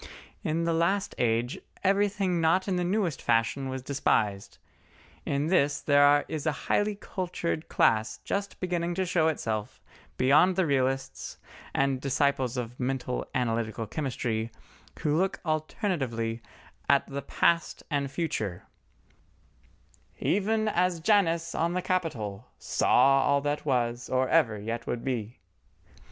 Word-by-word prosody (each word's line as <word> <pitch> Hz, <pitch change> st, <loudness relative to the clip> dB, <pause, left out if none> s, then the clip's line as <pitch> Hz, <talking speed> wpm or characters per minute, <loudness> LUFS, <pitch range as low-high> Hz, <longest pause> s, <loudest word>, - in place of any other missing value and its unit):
In 160 Hz, +2 st, 0 dB
the 170 Hz, 0 st, +1 dB
last 180 Hz, +5 st, +1 dB
age, 120 Hz, +1 st, 0 dB, 0.2 s
everything 195 Hz, -2 st, +2 dB
not 165 Hz, +4 st, +2 dB
in 190 Hz, -, 0 dB
the 180 Hz, -, 0 dB
newest 180 Hz, -3 st, 0 dB
fashion 120 Hz, +4 st, +1 dB
was 130 Hz, -1 st, -5 dB
despised—in 130 Hz, +3 st, -3 dB
this 145 Hz, -4 st, +2 dB
there 145 Hz, 0 st, +4 dB
is 155 Hz, -1 st, -4 dB
a -, -, +4 dB
highly 205 Hz, 0 st, +1 dB
cultured 175 Hz, -5 st, -4 dB
class 110 Hz, 0 st, +2 dB
just 200 Hz, 0 st, -3 dB
beginning 175 Hz, -1 st, -1 dB
to 190 Hz, +1 st, 0 dB
show 170 Hz, -3 st, +2 dB
itself 110 Hz, -9 st, -2 dB, 0.4 s
beyond 145 Hz, +8 st, +5 dB
the 190 Hz, -1 st, +2 dB
Realists 135 Hz, -2 st, -1 dB, 0.4 s
and 135 Hz, -1 st, +1 dB
disciples 135 Hz, -2 st, 0 dB
of 120 Hz, 0 st, -5 dB
Mental 125 Hz, 0 st, -2 dB
analytical 115 Hz, -2 st, -1 dB
Chemistry, 115 Hz, -3 st, -2 dB, 0.5 s
who 150 Hz, -2 st, +1 dB
look 190 Hz, +4 st, 0 dB
alternately 145 Hz, -, -2 dB, 0.5 s
at 140 Hz, -, +4 dB
the 140 Hz, 0 st, -5 dB
Past 170 Hz, +3 st, +1 dB
and 140 Hz, -1 st, 0 dB
Future, 130 Hz, -, -3 dB, 1.5 s
Even 215 Hz, +3 st, +1 dB
as 180 Hz, -3 st, +1 dB
Janus 165 Hz, -3 st, +2 dB
on 170 Hz, +1 st, 0 dB
the 180 Hz, -, 0 dB
Capitol 125 Hz, -, -2 dB
Saw 135 Hz, 0 st, +3 dB
all 140 Hz, +1 st, +2 dB
that 145 Hz, +1 st, -2 dB
was 120 Hz, -2 st, 0 dB
or 130 Hz, 0 st, +1 dB
ever 125 Hz, -10 st, +3 dB
yet 115 Hz, +3 st, -4 dB
would 120 Hz, -, -3 dB
be. 120 Hz, -3 st, -3 dB
145 Hz, 130 wpm, -28 LUFS, 125-175 Hz, 1.5 s, beyond